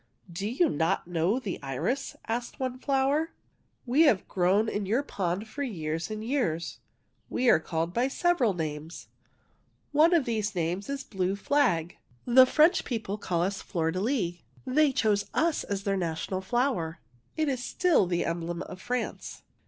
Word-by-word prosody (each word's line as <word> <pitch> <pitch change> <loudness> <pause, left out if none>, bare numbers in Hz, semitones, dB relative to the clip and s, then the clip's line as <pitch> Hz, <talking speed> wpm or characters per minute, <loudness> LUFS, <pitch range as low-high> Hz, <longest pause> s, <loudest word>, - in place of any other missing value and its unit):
'' 175 - -16
Do 205 - -1
you 300 +9 +2
not 160 +2 0
know 175 +5 +1
the 210 -8 -4
iris? 145 - -2
" - - -24
asked 235 +1 -3
one 255 -1 -3
flower. 280 +4 +1 0.2
" - - -42 0.2
We 260 +5 +3
have 195 - 0
grown 190 +4 +2
in 205 -2 -2
your 235 +8 +1
pond 190 -3 -2
for 285 +6 -7
years 165 - -3
and 215 0 -5
years. 225 - -1 0.5
We 250 -1 +3
are - - +5
called 165 +1 -2
by 245 +5 +2
several 275 - +2
names. 155 0 -5 0.8
One 315 +4 +5
of 310 -6 +3
these 220 -3 -1
names 175 +5 -2
is 280 0 -3
blue 190 -4 -1
flag. 200 - +1 0.2
<< 120 - -34
The 255 +1 +7
French 310 +6 +4
people 215 -4 -3
call 175 -3 0
us 195 +2 -2
fleur 165 -4 -1
de 185 - -3
lis. 205 -7 0 0.3
They 285 +3 +3
chose 210 -5 +1
us 325 -1 +1
as 200 -1 -3
their 195 -1 0
national 175 +2 -2
flower. 210 -7 -1 0.4
It 310 -1 +1
is 260 -3 -1
still 345 - +2
the 175 -1 0
emblem 170 0 -3
of 185 - -10
France." 250 +4 -4
210 Hz, 175 wpm, -28 LUFS, 175-260 Hz, 0.8 s, The